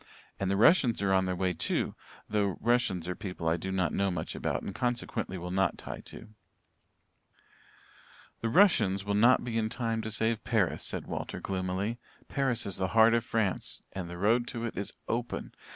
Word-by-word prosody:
And 95 - 0
the 100 - +1
Russians 120 - +5
are 95 -1 +2
on 95 0 +3
their 90 - -1
way, 90 0 0
too, 80 - -1 0.3
though 100 -3 0
Russians 115 -8 +1
are 90 - -1
people 90 -4 -5
I 80 - +3
do 95 +3 -4
not 90 -4 0
know 100 0 +1
much 90 -4 -3
about - - -2
and 100 - -5
consequently 120 -5 -2
will 90 0 -5
not 95 -1 +1
tie - - -7
to." - - -10 2.1
"The 115 - -1
Russians 110 - +4
will 100 - 0
not 120 +5 +5
be 115 -2 -1
in 110 -1 0
time 115 -1 -1
to 110 - -4
save 110 +1 0
Paris," 110 -6 +1
said - - -2
Walter - - -4
gloomily. 95 +4 -2 0.3
"Paris 130 -5 0
is 100 - -3
the 95 - 0
heart 110 +1 +7
of 115 -1 +2
France 110 -5 -1
and 90 -3 -5
the 90 - -7
road 115 +6 +2
to 115 0 -4
it 115 - -4
is 100 +2 -3 0.2
open. 120 +1 -3
100 Hz, 190 wpm, -30 LUFS, 95-115 Hz, 2.1 s, heart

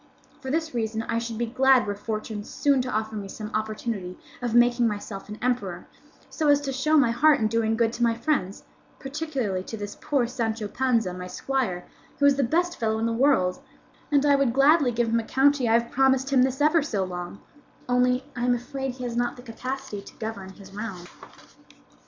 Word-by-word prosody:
For 265 -2 -7
this 320 +1 -1
reason 225 -1 -2
I 230 0 -1
should 230 -1 -5
be 235 - 0
glad 260 +2 +4
were 205 - -2
fortune 215 0 -5
soon 280 +4 +1
to 250 - -4
offer 215 +1 -2
me 205 -2 -5
some 215 +2 -7
opportunity 215 -3 -3 0.2
of 240 -1 -1
making 240 0 +4
myself 205 -2 -5
an 210 - -7
emperor, 250 0 -1 0.4
so 310 - -2
as 285 -1 +5
to 275 -2 -3
show 305 +4 +2
my 255 -5 +4
heart 290 +5 +4
in 220 - +1
doing 225 0 0
good 230 -1 +2
to 240 - -6
my 230 -1 +3
friends, 230 -6 -1 0.3
particularly 270 -9 -3
to 220 +4 -7
this 205 -1 -6
poor 275 -4 +1
Sancho 225 -3 -2
Panza, 230 -5 0
my 180 0 -7
squire, 185 -4 -2 0.3
who 285 - +2
is 285 -1 +6
the 275 - +1
best 345 +7 0
fellow 220 -1 0
in 225 - -1
the 230 - 0
world; 230 -8 +2 0.5
and 285 0 +3
I 285 -1 +5
would 275 -4 +2
gladly 280 0 +5
give 235 0 0
him 230 +1 +2
a - - -3
county 270 0 +2
I - - +4
have 235 0 +2
promised 265 0 +2
him 260 - +5
this 265 +2 +1
ever 310 +2 +4
so 220 -9 -1
long, 180 +1 -6 0.5
only 250 +1 +2
that 245 - -6
I - - +1
am 245 0 +3
afraid 265 +2 -4
he 255 - -8
has 240 -1 -3
not 240 0 0
the 245 - -13
capacity 255 -2 -5
to - - -14
govern 215 -4 -6
his 195 0 -14
realm." 200 -4 -6
240 Hz, 210 wpm, -25 LUFS, 220-270 Hz, 0.5 s, is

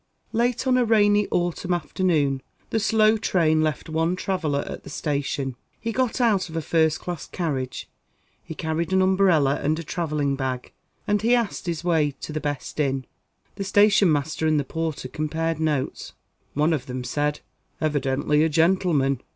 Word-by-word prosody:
Late 240 +3 0
on 255 -1 +3
a - - +4
rainy 210 -2 +4
autumn 175 +1 0
afternoon, 150 -4 0 0.3
the 225 - +1
slow 220 0 +3
train 160 -6 +2
left 155 -4 -1
one 165 +2 0
traveller 165 -7 -1
at - - -7
the - - -10
Station. 140 -3 -2 0.2
He 230 - -3
got 255 +1 0
out 210 -7 +2
of 160 - -9
a - - 0
first 160 0 +2
class 175 -4 -6
carriage; 135 -8 -3 0.6
he 160 - -8
carried 160 +2 -2
an 190 0 +4
umbrella 185 -7 +3
and 155 +2 +1
a 165 - -5
travelling 150 -4 -1
bag; 130 -2 -3 0.3
and 205 0 +1
he 235 +3 +4
asked 230 -6 -2
his 170 -2 -2
way 155 -5 +1
to 155 - -6
the 155 - -2
best 145 0 -4
inn. 135 -3 0 0.5
The 195 - -2
station 205 -2 +4
master 150 +2 0
and 155 -1 +3
the - - 0
porter 160 -2 -3
compared 160 +3 -2
notes. 150 -4 -2 0.4
One 150 +3 +2
of 145 -3 -3
them 125 0 -4
said: 150 +3 -1 0.4
"Evidently 150 -1 +1
a 160 - +2
gentleman." 160 -5 +2
160 Hz, 170 wpm, -24 LUFS, 145-190 Hz, 0.6 s, a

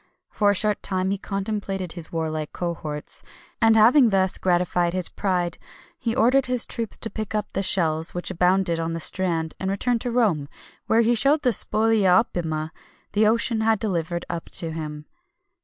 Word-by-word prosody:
For 205 -2 +2
a 205 - +3
short 210 +1 +2
time 190 0 -1
he 200 - -2
contemplated 195 -2 -4
his 170 -2 -5
warlike 155 -2 -3
cohorts, 160 -4 -3 0.4
and 225 -1 +5
having 240 +3 +6
thus 190 -2 +1
gratified 175 -1 +1
his 185 -2 -1
pride, 180 -3 -2 0.4
he 230 0 -2
ordered 260 +2 +3
his 250 -2 0
troops 230 -2 -4
to 225 - -3
pick 215 -1 -5
up 210 - -3
the 195 - -1
shells 165 -4 0
which 175 +1 -3
abounded 180 -1 +1
on 165 0 -2
the 165 - -3
strand, 165 -2 -1
and 190 - -2
returned 230 +4 -1
to 245 - -2
Rome, 200 -13 +1 0.4
where 225 - +4
he 230 +1 +3
showed 280 +6 +3
the 250 - +3
"spolia 215 -5 +3
opima" 160 -4 -4 0.4
the 210 +1 +3
ocean 230 0 +1
had 220 0 +2
delivered 175 -4 -2
up 170 -1 -5
to 165 -2 +1
him. 150 -2 -6
190 Hz, 175 wpm, -23 LUFS, 170-220 Hz, 0.4 s, having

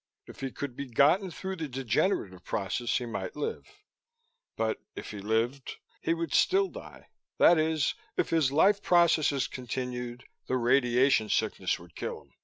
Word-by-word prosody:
If - - -13
he 135 - -3
could 130 -1 -6
be 140 0 -6
gotten 155 - +3
through 190 +3 -5
the 160 -2 -3
degenerative 125 - -1
period 100 0 -3
he 120 0 0
might 100 -5 -5
live. 150 - -4 0.9
But, 110 -1 -1 0.2
if - - -7
he 105 - -7
lived, 115 +6 -1 0.3
he 165 - +1
would 165 -2 -3
still 390 +1 +3
die. - - -12 0.3
That 170 - +6
is, 155 -2 +1 0.2
if - - 0
his 160 -5 +3
life 195 +8 +4
processes 165 -7 +3
continued, 125 -1 -5 0.2
the 130 - +1
radiation 125 -1 +3
sickness 95 -5 0
would 85 0 -15
kill - - -4
him. - - -29
130 Hz, 160 wpm, -29 LUFS, 120-160 Hz, 0.9 s, That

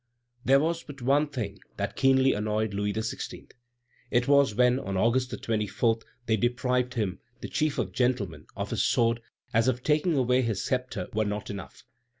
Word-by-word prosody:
There 135 +1 +5
was 165 +3 0
but 140 -3 -11
one 140 +4 +3
thing 110 -9 -5 0.2
that - - -3
keenly 135 0 +4
annoyed 105 0 -1
Louis 105 +1 0
XVI. 110 +1 -5 0.6
It 125 0 +2
was 140 -6 +4
when, 125 +2 +4
on 100 -6 -3
August 125 +5 +2
24, 110 +1 0 0.3
they 110 -1 +2
deprived 125 +2 0
him, 95 -5 -1 0.2
the - - -4
chief 150 -1 0
of 105 -7 -1
gentlemen, 100 - -1
of - - -4
his - - +1
sword, 115 0 +2 0.3
as 115 +2 +3
if 125 -1 0
taking 155 +1 +2
away 125 0 +3
his 110 -6 -1
sceptre 125 -8 -2
were 110 +1 +2
not 105 0 -3
enough. 100 -1 -9
120 Hz, 170 wpm, -28 LUFS, 105-130 Hz, 0.6 s, There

